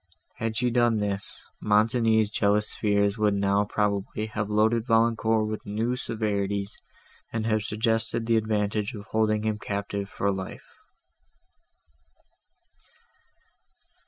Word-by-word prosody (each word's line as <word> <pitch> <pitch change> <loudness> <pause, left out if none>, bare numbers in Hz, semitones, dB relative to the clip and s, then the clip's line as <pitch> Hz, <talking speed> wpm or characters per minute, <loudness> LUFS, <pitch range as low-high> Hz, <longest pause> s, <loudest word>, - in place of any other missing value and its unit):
Had 110 -1 -2
she 125 0 +1
done 120 -1 +3
this, 100 -1 -3 0.2
Montoni's 110 0 +3
jealous 105 0 +2
fears 100 0 +1
would 105 -1 +3
now 100 +1 +2
probably 105 0 -1
have 105 -1 -3
loaded 110 +2 +2
Valancourt 115 -1 +2
with 110 0 -4
new 110 +4 -1
severities, 100 -4 -2 0.6
and 110 -1 -2
have 110 -1 +1
suggested 115 +2 -1
the 115 0 +2
advantage 105 +1 -1
of 100 -1 -8
holding 110 -1 +1
him 110 -1 0
a - - -10
captive 100 0 -3
for 100 +1 -1
life. 95 0 -7
105 Hz, 120 wpm, -26 LUFS, 100-115 Hz, 0.6 s, done